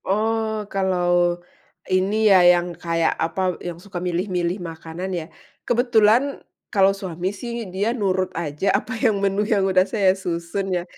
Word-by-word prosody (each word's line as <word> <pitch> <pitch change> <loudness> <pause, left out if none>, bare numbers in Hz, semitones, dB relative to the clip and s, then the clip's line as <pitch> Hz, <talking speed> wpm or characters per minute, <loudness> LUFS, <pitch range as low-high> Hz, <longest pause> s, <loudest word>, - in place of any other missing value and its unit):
Oh 220 +1 0
kalau, 175 -2 +1 0.5
ini 185 +2 +1
ya 190 -2 +7
yang 175 0 +4
kayak 165 -1 0
apa 180 +2 -1
yang 175 -1 -6
suka 185 -2 -7
milih-milih 180 0 -1
makanan 165 +2 -6
ya, 170 -3 -3 0.4
kebetulan, 240 +2 +3 0.3
kalau 195 -1 +4
suami 185 -2 -4
sih 235 +1 -5
dia 195 +5 -1
nurut 190 -5 0
aja 165 +3 -1
apa 250 +6 -1
yang 220 -3 +1
menu 200 +1 +1
yang 205 -3 +1
udah 185 -1 +4
saya 195 -3 +2
susun 185 +1 -3
ya, 175 - -3
190 Hz, 150 wpm, -22 LUFS, 175-210 Hz, 0.5 s, ya